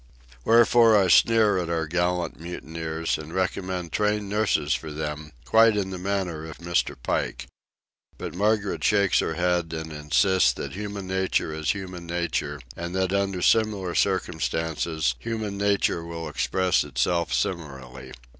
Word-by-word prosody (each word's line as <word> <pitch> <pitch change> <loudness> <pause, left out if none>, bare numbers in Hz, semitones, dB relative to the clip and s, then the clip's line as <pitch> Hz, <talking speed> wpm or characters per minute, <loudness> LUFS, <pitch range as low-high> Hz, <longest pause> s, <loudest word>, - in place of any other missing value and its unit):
Wherefore 115 - +6
I 95 -2 +3
sneer 110 0 +5
at 85 -2 -3
our 80 -1 0
gallant 90 +2 -1
mutineers, 80 -1 -4
and 80 +1 -9
recommend 90 -1 -2
trained 105 +1 0
nurses 100 -8 +1
for 80 - -4
them, 75 0 -5
quite 110 -1 +5
in 95 -2 -1
the 90 - -5
manner 95 -4 -2
of 80 - -9
Mr. 85 0 -1
Pike. - - -2 0.7
But - - -6
Margaret 105 +1 0
shakes 100 -3 +3
her 80 - -1
head 90 -1 0
and 80 0 -5
insists 75 -1 +2
that 70 - -6
human 100 -1 -5
nature 95 -4 -1
is 80 -1 0
human 90 -3 -7
nature, 85 0 -2 0.2
and 85 +2 -5
that 95 0 0
under 100 -2 0
similar 105 -5 +2
circumstances 80 -5 0
human 110 - -4
nature 100 -4 +1
will 85 -1 -6
express 90 +5 +1
itself 75 +5 0
similarly. 65 -7 -4
90 Hz, 145 wpm, -25 LUFS, 80-100 Hz, 0.7 s, Wherefore